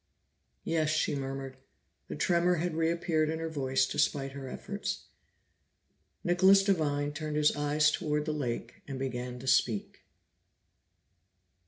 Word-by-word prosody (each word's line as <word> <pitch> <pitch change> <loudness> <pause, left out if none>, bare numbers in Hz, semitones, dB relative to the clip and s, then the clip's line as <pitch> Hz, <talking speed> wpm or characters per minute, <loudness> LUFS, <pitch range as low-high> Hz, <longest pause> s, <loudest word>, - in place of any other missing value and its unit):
"Yes," 160 -2 +1
she 155 -1 +1
murmured. 135 -1 -5 0.5
The - - -5
tremor 175 0 +2
had 175 +1 -1
reappeared 160 -1 +1
in 160 - -1
her 165 0 -3
voice 130 -3 +1
despite 135 -1 0
her 135 -1 -7
efforts. 200 +8 -4 1.2
Nicholas 190 +2 +5
Devine 145 -7 +1
turned 155 0 -4
his 150 0 +3
eyes 150 +1 +3
toward 150 -1 -1
the 155 - -1
lake 130 -6 -4
and 135 -2 -5
began 125 -1 -4
to 125 - -9
speak. 115 -5 +1
150 Hz, 130 wpm, -30 LUFS, 135-165 Hz, 1.2 s, Nicholas